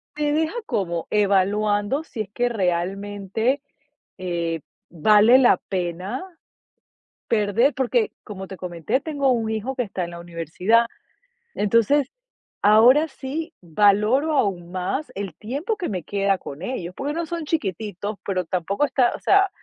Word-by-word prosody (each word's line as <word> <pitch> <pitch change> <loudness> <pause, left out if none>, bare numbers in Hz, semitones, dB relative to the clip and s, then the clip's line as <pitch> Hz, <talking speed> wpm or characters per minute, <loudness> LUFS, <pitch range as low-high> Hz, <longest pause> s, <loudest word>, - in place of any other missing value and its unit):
Te 295 -1 0
deja 315 +5 +1
como 175 - -2
evaluando 205 +5 +2
si 230 -8 -6
es 195 - -5
que 245 +2 0
realmente, 200 +5 -1 0.6
eh, 170 -3 -2 0.3
vale 210 +9 +6
la 250 - +5
pena 185 - -3 1.1
perder, 225 +5 +2
porque, 245 -3 +1
como 190 -2 -7
te 190 - -8
comenté, 180 - -2
tengo 285 -4 0
un 225 -3 0
hijo 220 +5 -2
que 250 - +1
está 195 -5 -3
en 170 - -8
la 170 - -8
universidad. 175 +7 +1 0.7
Entonces, 230 +7 +2 0.5
ahora 240 +9 +6
sí 305 +4 -6
valoro 210 - +3
aún 180 -8 0
más 185 +11 -3
el 195 -3 -4
tiempo 285 - -3
que 365 - -3
me 185 -4 -3
queda 195 +2 +1
con 145 -3 -9
ellos, 185 -5 -4
porque 285 +2 -3
no 335 +1 -2
son 335 0 -4
chiquititos, 205 - -3
pero 185 -2 0
tampoco 190 - 0
ta 250 -3 +2
o - - -8
sea, 395 0 +4
210 Hz, 145 wpm, -23 LUFS, 185-265 Hz, 1.1 s, vale